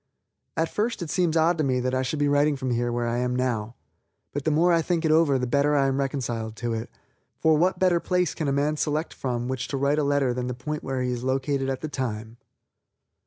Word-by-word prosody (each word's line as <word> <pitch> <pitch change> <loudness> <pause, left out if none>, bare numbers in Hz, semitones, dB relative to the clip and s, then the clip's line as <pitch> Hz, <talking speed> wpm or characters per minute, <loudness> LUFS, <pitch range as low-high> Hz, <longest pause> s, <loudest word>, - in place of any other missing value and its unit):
At 165 - +2
first 220 -2 -1
it 160 - -5
seems 170 -3 +1
odd 165 +1 +3
to - - +2
me 130 -2 +1
that 130 +1 -1
I 130 - +1
should 130 +4 -2
be 145 0 +2
writing 145 +1 +3
from 130 -3 -2
where 120 0 -1
I 120 +1 0
now 125 -3 0
am, 115 - -16 0.6
but 145 -1 -3
the - - +3
more 170 +3 +3
I 165 - +4
think 170 0 -1
it 155 - +3
over 155 -4 +4
the 125 - -1
better 140 +4 +2
I 140 -1 +3
am 135 0 0
reconciled 120 -5 -2
to 120 +1 -3
it, 115 0 -4 0.5
for 160 -1 +3
what 180 +5 +2
better 180 -2 +3
place 180 -1 0
can 155 - -3
a - - +1
man 145 +2 +1
select 155 +2 -1
from 120 -2 -3
which 130 0 -3
to 140 - -3
write 140 +2 +2
a - - +1
letter 140 -3 +2
than 125 0 -3
the 125 - -3
point 150 +5 -4
where 130 -1 -2
he 125 - -1
is 120 0 -4
located 135 +1 0
at 135 -1 -3
the 155 - -3
time. 115 -5 -4
140 Hz, 250 wpm, -25 LUFS, 125-155 Hz, 0.6 s, I